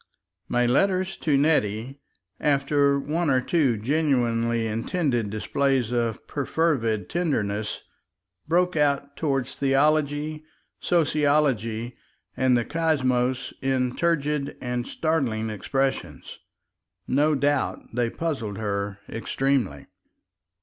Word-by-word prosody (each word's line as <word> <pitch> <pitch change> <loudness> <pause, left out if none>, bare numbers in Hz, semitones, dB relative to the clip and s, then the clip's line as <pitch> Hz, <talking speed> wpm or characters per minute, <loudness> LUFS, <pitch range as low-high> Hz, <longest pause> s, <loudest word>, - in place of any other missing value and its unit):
My 120 0 +2
letters 185 +9 +2
to 145 -3 +1
Nettie, 135 -3 +1 0.4
after 140 0 +2
one 160 +3 -1
or 130 -1 +4
two 135 -4 +1
genuinely 115 -3 +1
intended 115 - -1
displays 130 +3 0
of 115 -2 -1
perfervid 135 -7 0
tenderness, 110 - -2 0.6
broke 180 +2 +2
out 140 -1 +1
toward 135 -5 0
theology, 150 +3 +1 0.4
sociology, 140 -8 +1 0.4
and 130 -2 +3
the 120 - 0
cosmos 130 -6 0
in 130 -2 0
turgid 150 -4 0
and 125 -1 -3
startling 125 -9 -1
expressions. 135 +6 -3 0.7
No 150 +3 +3
doubt 145 -1 0
they 120 0 0
puzzled 125 -10 -3
her 100 -2 -2
extremely. 120 - -1
135 Hz, 95 wpm, -25 LUFS, 115-150 Hz, 0.7 s, or